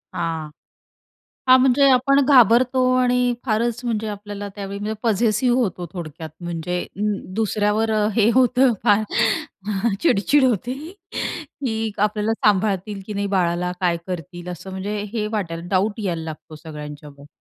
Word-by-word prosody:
हां. 165 -2 -3 1.0
हां. 255 0 +8
म्हणजे 270 +2 +5
आपण 265 +2 +4
घाबरतो 255 -1 +5 0.2
आणि 250 0 +2
फारच 230 +1 0
म्हणजे 220 -2 -1
आपल्याला 205 0 -6
त्यावेळी 200 -1 -6
म्हणजे 215 +1 -3
पझेसिव्ह 230 +3 +2
होतो 185 -6 -1
थोडक्यात 160 -2 -7
म्हणजे 175 +1 -3 0.2
अं, 205 -2 -2
दुसऱ्यावर 215 0 +1 0.2
हे 225 0 +4
होतं 255 0 +4
फार. 205 +1 +4 1.0
चिडचिड 265 +8 +3
होते 245 0 +1 0.9
की 225 -4 -1
आपल्याला 210 +1 +1
सांभाळतील, 200 0 +1
की 210 - -6
नाही 200 0 -1
बाळाला. 180 -2 0
काय 175 -2 +2
करतील 175 0 -6
असं 180 +2 -8
म्हणजे 195 +3 -4 0.2
हे 215 -2 -1
वाटायला. 170 -6 -3
डाउट 200 +3 +1
यायला 170 -4 -2
लागतो 160 0 -9
सगळ्यांच्यावर. 150 -2 -9
205 Hz, 130 wpm, -22 LUFS, 180-235 Hz, 1.0 s, हां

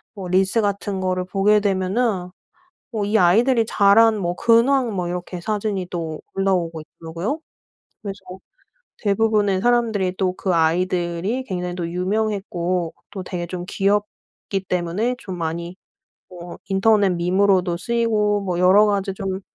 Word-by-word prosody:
뭐 190 -2 -6
릴스 190 +4 +2
같은 200 -1 -2
거를 185 -1 -1
보게 200 +3 +3
되면은 195 0 0 0.6
뭐 210 -2 -1
이 215 - +1
아이들이 230 +7 +4
자란 215 +2 +4
뭐 175 -2 -2
근황 235 0 +3
뭐 180 -2 -2
이렇게 180 0 -5
사진이 205 -2 -2
또 165 -3 -4
올라오고 175 -5 0
있더라고요. 170 - -5 0.6
그래서 200 -1 -6 0.8
대부분의 205 -2 +1
사람들이 220 -6 +1
또 185 -2 0
그 185 -1 -1
아이들이 175 +7 0
굉장히 180 -5 -4
또 175 -2 -3
유명했고 185 -2 -2 0.2
또 190 -2 -6
되게 175 -1 -4
좀 175 0 -5
귀엽기 200 -1 -2
때문에 180 +7 -1
좀 185 -3 -7
많이 170 +2 -4 0.6
뭐 175 -1 -9
인터넷 200 0 +3
밈으로도 180 0 +2
쓰이고 210 0 +1
뭐 180 -2 -2
여러 190 +4 +6
가지 200 -1 0
좀 190 0 -4
190 Hz, 290 characters per minute, -21 LUFS, 180-210 Hz, 0.8 s, 여러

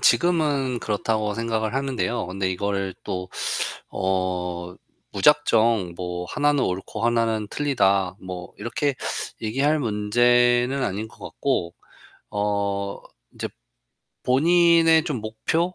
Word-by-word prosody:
지금은 145 -8 +2
그렇다고 105 0 -1
생각을 115 0 -1
하는데요. 130 -4 -1
근데 95 +1 -2
이거를 100 0 -2
또 90 0 -4 0.7
어 90 -2 -2 0.4
무작정 110 -6 +3
뭐 90 0 -4
"하나는 145 -2 +2
옳고 95 +4 -3
하나는 115 -2 +1
틀리다." 100 -10 +1
뭐 90 -1 -7
이렇게 130 +6 -1 0.5
얘기할 135 +8 +1
문제는 120 +3 +3
아닌 105 +3 -2
것 - - -16
같고. 90 -11 -1 0.6
어 100 -1 -1 0.3
이제 - - -4 0.7
본인의 165 +3 +5
좀 145 -9 -2
목표, 160 +12 -1
110 Hz, 230 characters per minute, -24 LUFS, 95-135 Hz, 0.7 s, 본인의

